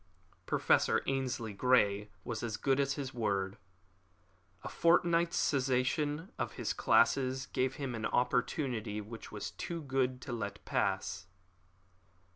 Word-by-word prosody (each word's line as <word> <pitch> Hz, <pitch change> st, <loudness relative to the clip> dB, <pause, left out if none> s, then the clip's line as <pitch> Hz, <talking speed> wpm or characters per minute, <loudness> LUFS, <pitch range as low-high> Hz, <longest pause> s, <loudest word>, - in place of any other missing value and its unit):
Professor -, -, +3 dB
Ainslie 130 Hz, -5 st, -2 dB
Grey 105 Hz, -2 st, +3 dB
was 115 Hz, -2 st, -4 dB
as 115 Hz, -2 st, -3 dB
good 135 Hz, 0 st, +1 dB
as 140 Hz, 0 st, +2 dB
his 135 Hz, -2 st, -5 dB
word. 100 Hz, -4 st, -1 dB, 1.0 s
A -, -, -5 dB
fortnight's 170 Hz, 0 st, +3 dB
cessation 145 Hz, -, +1 dB
of -, -, -2 dB
his -, -, -2 dB
classes 130 Hz, 0 st, +3 dB
gave 130 Hz, 0 st, -1 dB
him 140 Hz, -5 st, -4 dB
an 110 Hz, -2 st, -2 dB
opportunity 125 Hz, -3 st, 0 dB
which 110 Hz, +2 st, -9 dB
was 105 Hz, -, -5 dB
too 170 Hz, -2 st, -5 dB
good 130 Hz, -2 st, 0 dB
to 125 Hz, -, -5 dB
let 100 Hz, -3 st, -5 dB
pass. 95 Hz, -1 st, -1 dB
130 Hz, 125 wpm, -33 LUFS, 110-140 Hz, 1.0 s, Professor